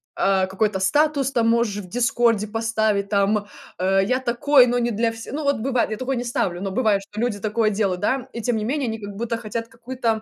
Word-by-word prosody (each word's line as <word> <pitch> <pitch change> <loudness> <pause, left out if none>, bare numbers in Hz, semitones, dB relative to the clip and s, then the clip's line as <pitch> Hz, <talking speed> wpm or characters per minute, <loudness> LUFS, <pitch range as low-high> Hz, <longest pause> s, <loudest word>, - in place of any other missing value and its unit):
а, 195 -1 +2
какой-то 195 +1 -1
статус 285 +6 +2
там 230 -3 +2
можешь 230 -3 +1
в 180 - -13
"Дискорде" 235 -2 +2
поставить, 220 -2 0
там, 205 0 +1 0.3
э: 195 +1 +3
"Я 255 +4 +1
такой, 255 +1 +4
но 245 +1 +1
не 240 0 0
для 225 +2 0
все" 225 +1 -9
Ну 300 +2 -3
вот 280 0 +1
бывает, 250 -1 0
я 215 - -3
такое 260 +3 -2
не 245 - -2
ставлю, 185 -7 -2
но 195 - -2
бывает, 210 -3 +2
что 210 +2 -9
люди 235 -4 -1
такое 215 +1 +1
делают, 195 -3 -1
да, 260 +4 0
и 235 - -5
тем 240 +1 0
не 215 - -2
менее, 275 +1 -1
они 225 0 -3
как 205 -1 -8
будто 230 +2 -2
хотят 230 0 -5
какую-то, 230 -1 -3
225 Hz, 230 wpm, -22 LUFS, 205-245 Hz, 0.3 s, такой